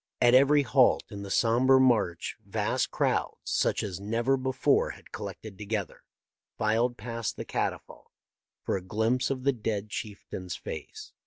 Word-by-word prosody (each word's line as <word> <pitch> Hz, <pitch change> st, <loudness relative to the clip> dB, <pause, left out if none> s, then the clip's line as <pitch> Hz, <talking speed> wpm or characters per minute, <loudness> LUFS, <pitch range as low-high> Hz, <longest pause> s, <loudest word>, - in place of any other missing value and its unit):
At 120 Hz, 0 st, +5 dB
every 140 Hz, +3 st, +6 dB
halt 130 Hz, 0 st, +4 dB
in 100 Hz, -1 st, -6 dB
the 100 Hz, -, -7 dB
sombre 125 Hz, +5 st, +4 dB
march 110 Hz, -10 st, +2 dB
vast -, -, -1 dB
crowds, -, -, 0 dB
such -, -, 0 dB
as 95 Hz, -3 st, -4 dB
never 115 Hz, +6 st, +1 dB
before 130 Hz, 0 st, +1 dB
had -, -, -11 dB
collected 105 Hz, -4 st, -8 dB
together, 105 Hz, -2 st, -4 dB, 0.6 s
filed 115 Hz, +3 st, +1 dB
past 115 Hz, -2 st, -4 dB
the -, -, -5 dB
catafalque -, -, -4 dB, 0.5 s
for -, -, -1 dB
a 95 Hz, -, -2 dB
glimpse 110 Hz, +6 st, 0 dB
of 130 Hz, -2 st, -3 dB
the 140 Hz, 0 st, +3 dB
dead 105 Hz, -3 st, -3 dB
chieftain's 95 Hz, -4 st, -6 dB
face. 80 Hz, -, -8 dB
115 Hz, 150 wpm, -28 LUFS, 100-130 Hz, 0.6 s, every